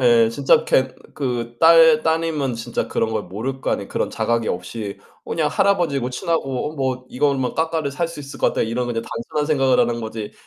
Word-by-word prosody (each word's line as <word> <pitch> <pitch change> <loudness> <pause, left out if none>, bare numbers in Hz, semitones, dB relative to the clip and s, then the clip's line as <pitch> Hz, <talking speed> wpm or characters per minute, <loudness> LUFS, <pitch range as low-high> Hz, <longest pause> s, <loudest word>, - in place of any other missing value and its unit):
예. 120 -2 +5
진짜 135 +4 +3
그렇게 130 0 +2 0.2
그 120 -4 -3
딸 160 -1 +7
따님은 160 -5 0
진짜 115 +1 -3
그런 110 - -1
걸 110 -1 -1
모를 130 +7 -5
거 - - -2
아니에요. - - -1
그런 - - -2
자각이 115 -1 0
없이 100 +3 -5 0.3
그냥 - - -1
할아버지고 145 -10 +1
친하고 150 -1 -2
어 - - -13
뭐 130 -2 -2
이걸 140 +2 +1
뭐 130 -1 -2
'까까를 160 -2 -1
살 170 +3 -1
수 165 -2 -10
있을 140 -1 -10
것 - - +4
같다.' - - -1
이런 120 +2 -2
그냥 115 -1 -2
단순한 150 +7 -3
생각을 135 -4 +2
하는 120 0 +1
거지 110 -1 -6
130 Hz, 395 characters per minute, -21 LUFS, 115-155 Hz, 0.3 s, 딸